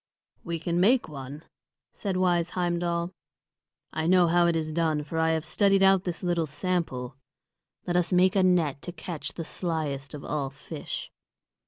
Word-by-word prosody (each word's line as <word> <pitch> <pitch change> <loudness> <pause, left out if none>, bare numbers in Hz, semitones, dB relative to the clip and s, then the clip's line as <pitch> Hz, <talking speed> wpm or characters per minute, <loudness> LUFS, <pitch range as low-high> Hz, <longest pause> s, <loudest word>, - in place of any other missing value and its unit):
"We 170 0 -3
can 170 +1 -1
make 235 +7 +4
one," 145 0 -8 0.5
said 195 -3 -3
wise 175 -2 +2
Heimdal. 175 0 -1 0.8
"I 160 0 -1
know 180 0 +6
how 170 +1 +4
it 170 - +2
is 155 -1 -2
done, 160 -2 +1
for 160 +2 -3
I 160 0 +3
have 160 0 0
studied 195 +3 +3
out 195 -1 +5
this 175 -1 -3
little 170 -2 +1
sample. 140 -7 -2 0.7
Let 175 - -1
us 180 +1 +2
make 185 +2 +4
a 195 - +4
net 170 -7 +2
to 175 - -5
catch 170 -2 -6
the 165 - -4
slyest 155 -6 -3
of 145 - -8
all 145 -2 -2
fish." 135 0 -7
170 Hz, 170 wpm, -27 LUFS, 155-180 Hz, 0.8 s, know